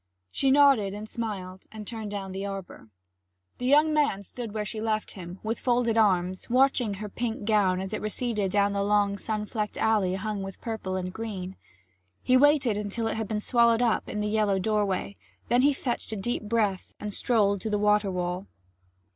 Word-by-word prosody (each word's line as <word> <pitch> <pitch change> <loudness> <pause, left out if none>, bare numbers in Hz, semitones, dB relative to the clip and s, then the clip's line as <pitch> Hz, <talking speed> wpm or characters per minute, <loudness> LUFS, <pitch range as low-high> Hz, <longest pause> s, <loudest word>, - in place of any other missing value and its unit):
She 270 - +1
nodded 265 -8 +5
and 210 +1 -7
smiled 190 -5 -5
and 215 -1 -8
turned 220 -1 -5
down 195 -2 -5
the 190 +1 -4
arbour. 195 - -7 0.7
The 250 - -2
young 300 +3 +5
man 285 -10 +1
stood 230 +3 -6
where 210 0 -3
she 215 +1 -4
left 215 -1 -1
him, 180 -1 -8
with 225 +2 -2
folded 240 -2 +1
arms, 185 -4 +2
watching 250 -4 +3
her 210 +2 -6
pink 225 0 -4
gown 200 -4 +3
as 190 +2 -5
it 215 - -3
receded 215 -2 -1
down 200 +1 +2
the 200 - 0
long 200 0 +2
sun 215 -1 -2
flecked 210 -1 -3
alley 205 -4 +2
hung 210 +1 -3
with 195 0 -7
purple 220 -5 -4
and 185 -1 -3
green. 190 -4 -5 0.7
He 255 - +3
waited 275 -5 +4
until 210 +2 -3
it - - 0
had 220 -1 -3
been 215 0 -1
swallowed 235 +1 +3
up 230 -2 +1
in 210 - -3
the 210 - -1
yellow 210 -2 +2
doorway; 200 -1 -1 0.3
then 245 +1 +4
he 285 +2 +5
fetched 255 -5 -3
a - - -2
deep 220 +2 -3
breath 210 -5 0
and 210 -1 -5
strolled 200 -5 +2
to 220 - -3
the 210 - +1
water 210 0 +3
wall. 180 +1 -3
210 Hz, 195 wpm, -27 LUFS, 195-230 Hz, 0.7 s, nodded